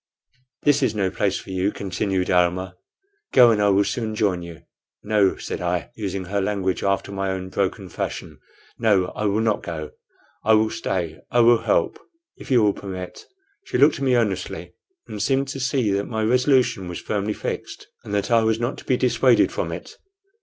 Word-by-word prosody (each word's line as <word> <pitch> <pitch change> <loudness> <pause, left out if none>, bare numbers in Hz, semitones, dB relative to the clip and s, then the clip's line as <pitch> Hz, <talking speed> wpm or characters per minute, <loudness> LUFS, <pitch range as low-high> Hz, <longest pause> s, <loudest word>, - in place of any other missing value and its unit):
"This 145 -1 +3
is 120 -5 +1
no 95 -3 0
place 100 -2 0
for - - -9
you," 95 +2 0
continued 95 -1 -2
Almah. 90 +1 +1 0.6
"Go, 120 -2 +8
and 105 -2 +1
I 105 - +4
will 100 +1 +4
soon 110 0 -3
join 100 -5 +1
you." 85 -2 -10 0.4
"No," 105 -2 +2
said - - -6
I, 90 0 -2
using 95 -3 -4
her 100 +3 -1
language 95 -2 -1
after 100 0 0
my 95 -1 -2
own 95 0 -4
broken 95 0 -2
fashion 75 -3 -5 0.4
"no, 100 -5 +3
I 105 - -2
will 105 +2 +1
not 110 -2 +1
go 80 -3 -6 0.5
I 110 0 +5
will 110 0 +2
stay, 85 -4 -3
I 120 - +3
will 120 0 +6
help, - - +1 0.4
if - - -12
you 125 -4 +4
will 105 -1 +3
permit." 95 -2 -8 0.4
She - - -2
looked 145 +5 +5
at - - -9
me 130 -2 +3
earnestly, 95 -5 -2 0.3
and 105 - -6
seemed 135 0 +1
to 135 - -5
see 125 -3 0
that 100 +1 0
my 110 -2 -2
resolution 125 -4 +2
was 90 -1 -5
firmly 105 0 -2
fixed, - - -6 0.2
and - - -9
that 100 +3 -1
I 115 -1 +5
was 110 0 +1
not 120 +3 -2
to - - -13
be 130 - +2
dissuaded 125 0 +3
from - - -3
it. - - -8
100 Hz, 195 wpm, -23 LUFS, 95-115 Hz, 0.6 s, Go